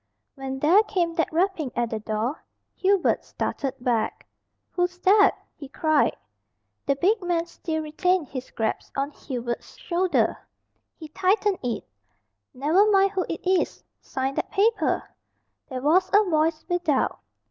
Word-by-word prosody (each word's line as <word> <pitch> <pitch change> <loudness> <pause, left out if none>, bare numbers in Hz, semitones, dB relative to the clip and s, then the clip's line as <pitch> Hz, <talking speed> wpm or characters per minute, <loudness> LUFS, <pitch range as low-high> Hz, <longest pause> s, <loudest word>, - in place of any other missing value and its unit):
When 265 -1 -5
there 325 +9 +5
came 360 -6 -1
that 330 -1 0
rapping 330 -5 0
at 235 -1 -1
the 220 - -2
door, 220 +6 -3 0.3
Hubert 390 -1 +2
started 270 -2 -3
back. 235 -3 -1 0.5
"Who's 355 0 -1
that?" 400 +3 +5 0.2
he 280 -4 -10
cried. 310 +1 +2 0.7
The 275 - +3
big 400 +9 +2
man 345 -2 0
still 320 -2 -4
retained 345 +2 0
his 255 -2 -6
grasp 220 +4 -3
on 275 +2 -1
Hubert's 240 -4 -5
shoulder. 355 +1 +1 0.6
He 315 - -9
tightened 390 +4 +1
it. 235 -5 -3 0.6
"Never 325 +11 +3
mind 390 -1 +4
who 380 -3 -2
it 330 - -5
is. 370 0 +1 0.2
Sign 265 +1 -3
that - - -3
paper." 435 +3 +1 0.6
There 255 -2 -5
was 335 +6 +3
a 415 -1 +5
voice 315 -1 +1
without. 350 -6 0
325 Hz, 140 wpm, -25 LUFS, 270-370 Hz, 0.7 s, there